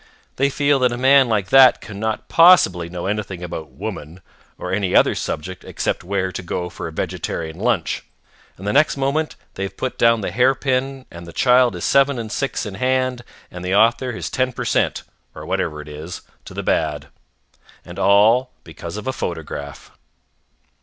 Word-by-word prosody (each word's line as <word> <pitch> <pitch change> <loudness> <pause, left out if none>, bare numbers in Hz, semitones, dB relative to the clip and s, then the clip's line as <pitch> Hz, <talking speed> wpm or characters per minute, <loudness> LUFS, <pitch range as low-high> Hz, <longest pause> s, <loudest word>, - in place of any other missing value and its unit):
They 140 +1 +2
feel 140 0 +2
that 125 -1 +3
a 120 - -3
man 135 0 +5
like 105 -4 0
that 135 -1 +7
cannot 110 +1 -4
possibly 95 - +5
know 90 0 -6
anything 100 -3 -3
about 80 -3 -6
Woman 80 +5 -7 0.4
or - - -5
any 95 -2 0
other - - +5
subject 90 +4 -5
except - - -3
where 95 0 -1
to 90 - -5
go 90 0 -4
for - - -6
a - - -7
vegetarian 80 +1 -4
lunch, 105 -8 0 0.5
and 95 - -10
the 105 - 0
next 145 0 +3
moment 140 +3 -1 0.2
they - - -8
have 95 0 -4
put 130 - -4
down 115 -1 +4
the 95 - -3
hair 125 +6 +3
pin 135 0 -2
and 85 0 -10
the - - -9
child 125 +2 +3
is 85 - -4
seven 140 -1 +3
and 110 -2 -5
six 135 -1 -2
in 105 - -6
hand 130 +2 0 0.3
and 90 0 -8
the 90 +1 0
author 120 +4 +3
his 115 - -5
ten 130 0 0
per - - -5
cent., - - 0 0.3
or - - -8
whatever 75 0 -2
it 75 - -13
is, 75 +4 -8 0.2
to - - -11
the - - -4
bad. 75 -2 -1 0.8
And 85 +2 -9
all 110 +6 +4
because 85 +3 -8
of 105 - -7
a 130 - -2
photograph. 75 - -6
105 Hz, 185 wpm, -20 LUFS, 90-130 Hz, 0.8 s, that